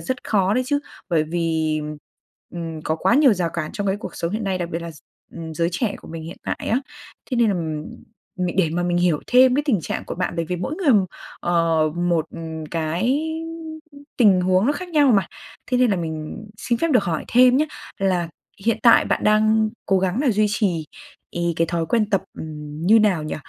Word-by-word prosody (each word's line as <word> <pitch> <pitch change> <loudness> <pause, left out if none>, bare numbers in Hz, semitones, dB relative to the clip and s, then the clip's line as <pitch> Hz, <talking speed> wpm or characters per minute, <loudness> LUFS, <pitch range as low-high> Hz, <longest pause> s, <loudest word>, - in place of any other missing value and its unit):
rất 255 -1 -4
khó 195 -1 +2
đấy 255 - +2
chứ. 285 +2 +1 0.3
Bởi 160 -3 +2
vì, 160 -1 0
ừm, 150 0 -6 0.6
ừm, 165 -2 -5
có 160 - -1
quá 235 - +2
nhiều 280 -4 +6
rào 175 -3 -1
cản 155 -2 -4
trong 205 - -3
cái 195 0 +1
cuộc 205 - -8
sống 170 - -2
hiện 215 +1 -2
nay, 190 -2 -1
đặc 175 -1 -3
biệt 165 0 -3
là 170 - -6
gi 155 - -14 0.4
ừm, 165 -1 -7
giới 170 +1 +1
trẻ 200 +3 -1
của - - -14
mình 165 0 -7
hiện 165 +3 -8
tại - - -3
á. 235 - +3 0.5
Thế 250 - 0
nên, 235 -2 +4
ừm, 160 -5 -2 0.6
mình 175 - -4
để 170 -4 +3
mà 175 +2 -1
mình 175 0 0
hiểu 175 -4 +2
thêm 255 0 +5
cái 290 - +2
tình 225 - +2
trạng - - -4
của - - -4
bạn 180 -1 -2
bởi 170 - 0
vì 180 +3 -3
mỗi 180 - -3
người, 340 -8 +3 0.5
ờ, 165 -2 +2
một 175 -2 +1 0.4
cái 170 - 0 1.0
tình 200 -7 +5
huống 185 +3 +2
nó 285 - +3
khác 360 +5 -6
nhau 295 -6 +4
mà, 195 -5 +3 0.4
thế 250 - +2
nên 250 -2 +4
là 195 - +1
mình 160 +4 -5
xin 235 -1 -1
phép 330 - +1
được 245 -6 +4
hỏi 165 -4 -2
thêm 250 +1 +6
nhá, 300 - +3 0.3
là 185 -3 0 0.4
hiện 230 - +2
tại 235 - +7
bạn - - -1
đang 215 +1 +3 0.2
cố 195 - +3
gắng 190 +5 0
nà 280 -3 +3
duy 215 0 +2
trì 185 -7 0 0.4
ì 170 0 -1
cái 165 - +2
thói 165 0 -2
quen 215 +3 +1
tập, 195 -2 +2 0.2
ừm, 150 0 -6
như 220 +4 +7
nào 195 -7 +2
nhỉ? 155 - -4
180 Hz, 220 wpm, -22 LUFS, 165-220 Hz, 1.0 s, tại